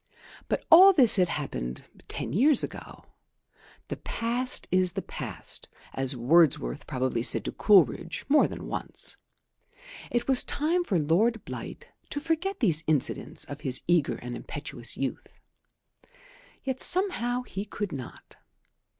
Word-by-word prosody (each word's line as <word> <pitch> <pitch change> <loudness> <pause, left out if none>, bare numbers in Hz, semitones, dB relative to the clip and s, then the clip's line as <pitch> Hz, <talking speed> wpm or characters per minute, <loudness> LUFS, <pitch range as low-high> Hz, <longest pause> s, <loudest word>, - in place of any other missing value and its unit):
But - - -2
all 375 +4 +9
this 255 - +6
had 180 -2 +3
happened 65 - -5 0.2
ten - - -3
years 265 - +4
ago. - - -8 0.8
The - - -5
past 240 +2 -2
is 185 -1 +2
the 195 - -4
past, - - -7 0.2
as 135 0 0
Wordsworth 130 - +2
probably 130 -2 -1
said - - +1
to - - -3
Coleridge 170 - +2
more 295 +2 +4
than - - -8
once. - - -4 0.9
It 240 0 -1
was 265 -2 +7
time 335 +5 -1
for 200 - 0
Lord 195 +9 +1
Blight - - -8 0.2
to 290 - -3
forget 330 +5 -2
these 165 -9 +2
incidents 155 -4 -1
of 145 +1 -9
his 130 -4 +1
eager 170 -4 +2
and 120 0 -7
impetuous 140 -5 -6
youth. 135 -1 -5 1.2
Yet 265 -1 -3
somehow 250 - +1
he 195 -5 -6
could 205 -2 -5
not. 130 -5 -10
190 Hz, 135 wpm, -27 LUFS, -, 1.2 s, all